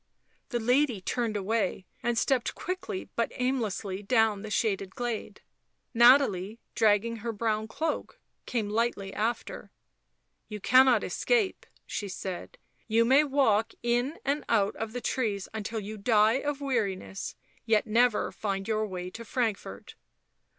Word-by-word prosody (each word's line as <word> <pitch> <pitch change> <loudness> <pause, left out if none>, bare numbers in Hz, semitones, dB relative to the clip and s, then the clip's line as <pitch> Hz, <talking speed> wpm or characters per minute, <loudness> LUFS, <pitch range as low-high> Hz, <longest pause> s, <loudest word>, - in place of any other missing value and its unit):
The 240 - -1
lady 250 0 +2
turned 225 +2 -1
away 200 -2 -1 0.2
and 240 -1 0
stepped 255 0 +1
quickly 370 +1 -5
but 230 - 0
aimlessly 220 -7 -2
down 220 -1 +2
the 215 - -7
shaded 195 -3 -1
glade. 240 -2 -4 0.5
Nathalie, 235 -4 +5
dragging 225 +1 +2
her 230 +2 -3
brown 220 0 -1
cloak, 315 +7 -3 0.3
came 225 -4 -1
lightly 210 -2 -1
after. 225 +2 -3 0.4
" - - -49
You 210 -1 -5
cannot 255 +1 +5
escape," 450 -6 0 0.2
she 205 - -4
said. 185 -1 -6 0.2
" - - -45
You 230 +1 +3
may 270 +5 +6
walk 265 -7 +2
in 245 +6 0
and 285 +2 0
out 205 -3 +3
the 245 +3 -6
trees 210 -8 -1
until 220 +1 -3
you 215 +1 -6
die 220 +3 +4
of 290 -1 -3
weariness, 205 -8 -2 0.3
yet 220 -1 +3
never 230 +1 +2
find 195 -2 -3
your 215 -1 0
way 180 -2 -5
to 230 - -8
Frankfort." 225 -2 -3
225 Hz, 140 wpm, -28 LUFS, 205-250 Hz, 0.5 s, may